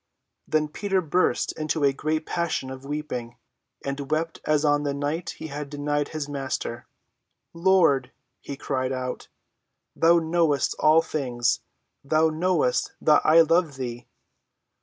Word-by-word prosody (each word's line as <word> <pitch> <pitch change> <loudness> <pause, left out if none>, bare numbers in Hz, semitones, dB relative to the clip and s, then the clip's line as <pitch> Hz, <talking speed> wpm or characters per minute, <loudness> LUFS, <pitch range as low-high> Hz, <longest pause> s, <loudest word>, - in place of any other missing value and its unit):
Then 155 -1 +1
Peter 195 +5 -1
burst 180 +1 +1
into 155 0 -2
a 140 -1 +4
great 155 +3 -2
passion 170 -6 -2
of 130 0 -9
weeping, 140 -5 -5 0.5
and 140 0 -4
wept 160 +1 -1
as 155 0 +2
on 145 0 +3
the 145 -1 -2
night 145 +4 -3
he - - -7
had 145 -1 -6
denied 145 0 -1
his 155 -2 -5
Master. 135 -4 -4 0.7
"Lord," 165 -8 +3 0.3
he 140 - -7
cried 130 -2 -2
out, 130 -1 -4 0.7
"thou 170 +1 +5
knowest 160 -4 +1
all 160 +2 +5
things; 125 -6 -1 0.4
thou 155 +3 +3
knowest 160 -4 0
that 150 -1 +4
I 160 +2 +7
love 165 -2 +2
thee!" 120 -2 -6
150 Hz, 140 wpm, -25 LUFS, 135-160 Hz, 0.7 s, I